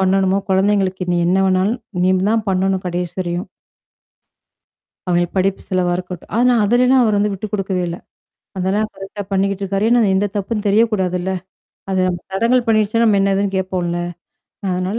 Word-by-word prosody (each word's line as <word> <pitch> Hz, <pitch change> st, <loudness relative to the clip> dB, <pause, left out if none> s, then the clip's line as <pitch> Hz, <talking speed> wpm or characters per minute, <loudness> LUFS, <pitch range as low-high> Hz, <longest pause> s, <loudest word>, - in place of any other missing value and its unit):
பண்ணணுமோ? 190 Hz, 0 st, +2 dB
குழந்தைங்களுக்கு 190 Hz, -1 st, +1 dB
நீ -, -, +1 dB
என்ன 185 Hz, -, +3 dB
வேணாலும் 190 Hz, +5 st, +1 dB, 0.2 s
நீ 185 Hz, -, +4 dB, 0.2 s
தான் 225 Hz, -1 st, +1 dB
பண்ணணும் 190 Hz, 0 st, 0 dB
கடைசி 175 Hz, 0 st, -3 dB
வரையும்." 175 Hz, 0 st, -3 dB, 1.6 s
அவங்க 175 Hz, 0 st, +2 dB
படிப்பு 190 Hz, +1 st, +1 dB
செலவா 180 Hz, -2 st, +1 dB
இருக்கட்டும் 180 Hz, -1 st, -8 dB
ஆனா 250 Hz, +1 st, +4 dB
அதிலனாம் 250 Hz, +4 st, +4 dB
அவர் 215 Hz, -2 st, +2 dB
வந்து 210 Hz, +1 st, +1 dB
விட்டு 195 Hz, +2 st, -4 dB
குடுக்கவே 195 Hz, -3 st, -1 dB
இல்ல. 170 Hz, -, -4 dB, 0.6 s
அதெல்லாம் 195 Hz, +4 st, 0 dB
கரெக்ட்டா 195 Hz, +1 st, -8 dB
பண்ணிக்கிட்டுருக்காரு. 195 Hz, +1 st, 0 dB
ஏன்னா 240 Hz, 0 st, +4 dB
எந்த 200 Hz, +2 st, +1 dB
தப்புன்னு 205 Hz, +1 st, -2 dB
தெரியக்கூடாதுல்ல. 190 Hz, -4 st, +1 dB, 0.6 s
அது 190 Hz, -, 0 dB
நம்ம 180 Hz, -1 st, -1 dB
தடங்கல் 235 Hz, +6 st, +2 dB
பண்ணிருச்சுண்ணா, 220 Hz, +1 st, +2 dB
நம்ம 205 Hz, -2 st, +4 dB
என்ன 195 Hz, 0 st, +2 dB
ஏதுன்னு 200 Hz, 0 st, 0 dB
கேட்போம்ல? 185 Hz, -2 st, -2 dB, 0.7 s
அதனால 185 Hz, +4 st, -1 dB
195 Hz, 150 wpm, -18 LUFS, 185-210 Hz, 1.6 s, நீ